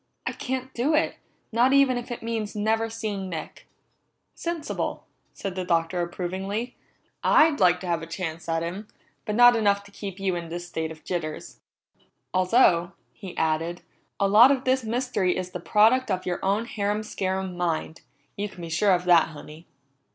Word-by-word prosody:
I - - -1
can't 260 0 -4
do 280 +6 +1
it, 315 - +1 0.3
not 240 +4 +3
even 275 -2 +5
if 245 0 -5
it 240 - -6
means 225 -2 -3
never 220 +2 0
seeing 210 -4 -4
Nick!" 160 -3 -7 0.7
"Sensible," 335 -3 -4 0.3
said 195 - -4
the 185 0 -3
Doctor 170 0 0
approvingly. 190 +7 -4 0.5
"I'd 310 -1 +5
like 180 -1 +4
to - - -6
have 170 -2 -1
a 165 - -7
chance 165 -1 -5
at 165 0 0
him, 190 +5 -5 0.4
but 210 - -2
not 245 +1 +7
enough 200 -3 +2
to 200 - -16
keep 200 -1 -7
you 190 -2 0
in 170 -1 -5
this 175 +1 -6
state 160 -2 -3
of 160 -1 -11
jitters. 165 -4 -5 0.7
Although," 185 -2 +3 0.2
he 180 +9 -10
added, 160 +2 -1 0.4
"a 200 - +3
lot 215 +6 +8
of 270 -2 +1
this 260 -1 +1
mystery 225 -5 0
is 185 0 -4
the 180 - -5
product 225 +8 +3
of 185 -2 -1
your 175 -1 -3
own 200 +4 +1
harum 210 -2 -2
scarum 190 -3 -3
mind. 165 -2 -2 0.3
You 205 +1 -3
can 175 - -11
be 165 - -6
sure 190 +5 +3
of 180 0 -4
that, 175 -2 +6
Honey." 155 +1 -12
195 Hz, 180 wpm, -25 LUFS, 175-225 Hz, 0.7 s, lot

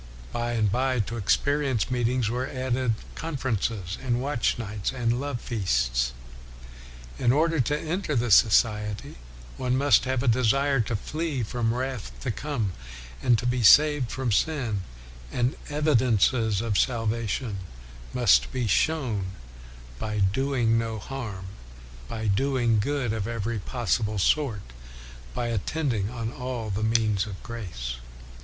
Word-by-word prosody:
By 120 0 -1
and 110 -4 +1
by, 130 +2 +1
to 115 +3 -4
experience 135 +3 +1
meet 120 -2 +1
ings 125 -2 0
were 125 +3 -1
added 130 -3 -1 0.2
conferences, 115 - -2
and 120 -2 0
watch 135 -2 0
nights, 105 -3 -3
and 120 -1 0
love 140 -3 -3
feasts. 65 - 0 1.1
In 120 -2 +3
order 160 +3 +2
to 145 +4 +1
enter 165 -1 -2
the 120 -1 +1
society 105 -1 +3 0.4
one 125 0 0
must 135 -3 +4
have 130 -1 0
a - - -1
desire 130 +4 +3
to 115 0 0
flee 150 +3 -2
from 115 +1 -1
wrath 130 -2 -3
to 130 - -1
come 115 -4 -2 0.5
and 120 -2 +4
to 125 - -4
be 125 0 +1
saved 145 +3 +6
from 130 -3 -2
sin; 120 -4 0 0.5
and 125 +2 0
evidences 125 -7 +2
of 110 -4 +1
salvation 115 -2 -1 0.5
must 60 0 +4
be 125 -2 -1
shown 120 -5 +1 0.4
" - - -17
by 105 -1 -3
doing 115 +3 +2
no 115 -1 -3
harm, 105 -5 -6 0.6
by 110 - -5
doing 120 +1 +2
good 125 0 0
of 110 -2 -2
every 115 -1 -2
possible 110 -1 -1
sort, 115 0 +1 0.7
by 120 - -1
attending 115 -1 -1
on 115 0 -4
all 125 -5 -4
the 100 +2 -2
means 110 -3 +2
of 95 -3 -8
grace. 80 - -5
120 Hz, 140 wpm, -26 LUFS, 105-130 Hz, 1.1 s, saved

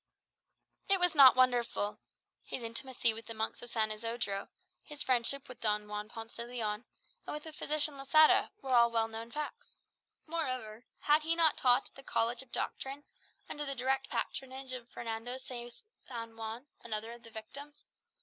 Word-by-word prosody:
It 390 -1 +5
was 355 -1 +4
not 275 -4 +9
wonderful. 240 -5 +2 0.4
His 250 - -5
intimacy 230 0 0
with 225 0 -8
the 230 - -6
monks 220 0 -2
of 240 - -4
San 220 -2 0
Isodro, 215 -2 -3 0.3
his 295 -1 -4
friendship 260 +2 +2
with 255 - -11
Don 210 -1 +1
Juan 210 0 -5
Ponce 225 0 -8
de 235 - -3
Leon, 230 -2 -3 0.4
and - - -3
with 300 - -6
the 315 - -9
physician 300 -1 0
Losada, 310 +3 +6
were 265 -1 -1
all 235 -1 +6
well 225 -1 +1
known 225 +1 -7
facts. 300 +4 -6 0.5
Moreover, 255 -9 -3 0.2
had 300 +1 +5
he 325 +2 +3
not 325 -3 +5
taught 250 +1 +5
at - - -29
the 270 - -11
College 235 -2 +1
of 265 -2 -14
Doctrine, 275 +2 -3 0.4
under 295 - -4
the 275 -1 -3
direct 265 +2 0
patronage 265 0 -4
of 250 -2 -6
Fernando 230 +2 -5
de 245 -2 -6 0.3
San 230 -2 -7
Juan, 225 +3 -6 0.2
another 220 0 -4
of 235 0 -11
the 230 - -13
victims. 280 +7 -9
245 Hz, 175 wpm, -33 LUFS, 225-275 Hz, 0.5 s, not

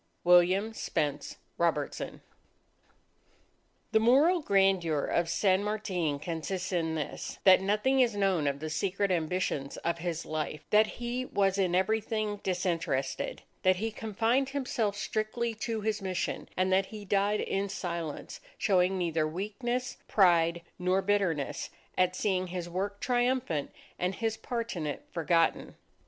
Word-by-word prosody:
_ - - -42 0.2
WILLIAM 180 +5 +4
SPENCE 150 -8 -2 0.2
ROBERTSON - - -1 1.7
_The 220 - +5
moral 290 +10 +5
grandeur 190 - +2
of 170 -1 0
San 190 +2 +2
Martin 190 -8 -1
consists 175 +5 -4
in 165 -3 0
this: 150 -3 -4
that 190 -1 +7
nothing 210 +7 +2
is 240 -4 +3
known 190 -7 +1
of 140 0 -1
the 155 - -3
secret 195 +3 0
ambitions 165 -4 -1
of 170 0 0
his 165 -1 -3
life; 155 -1 -4
that 215 +1 +6
he 245 +1 -2
was 195 -4 +1
in 180 -2 +2
everything 215 +2 0
disinterested; 170 -8 -2 0.2
that 185 0 +4
he 220 +4 -2
confined 225 +5 0
himself 245 -7 -1
strictly 215 +2 -2
to 225 0 -3
his 215 0 -1
mission; 185 -2 -3
and 185 0 +2
that 190 0 +3
he 210 -2 -9
died 200 +2 +2
in 195 +1 -1
silence, 170 -5 -5 0.2
showing 190 -2 +2
neither 165 -3 0
weakness, 215 +9 -3
pride, 170 -3 +4 0.2
nor 185 +2 +1
bitterness 190 -8 0 0.3
at 185 0 +2
seeing 185 -2 0
his 175 -1 -4
work 195 +3 -3
triumphant 245 - 0 0.3
and 180 +1 0
his 225 0 -1
part 230 0 -4
in 160 -3 -3
it 145 - -4
forgotten. 165 0 +1
190 Hz, 140 wpm, -30 LUFS, 170-215 Hz, 1.7 s, that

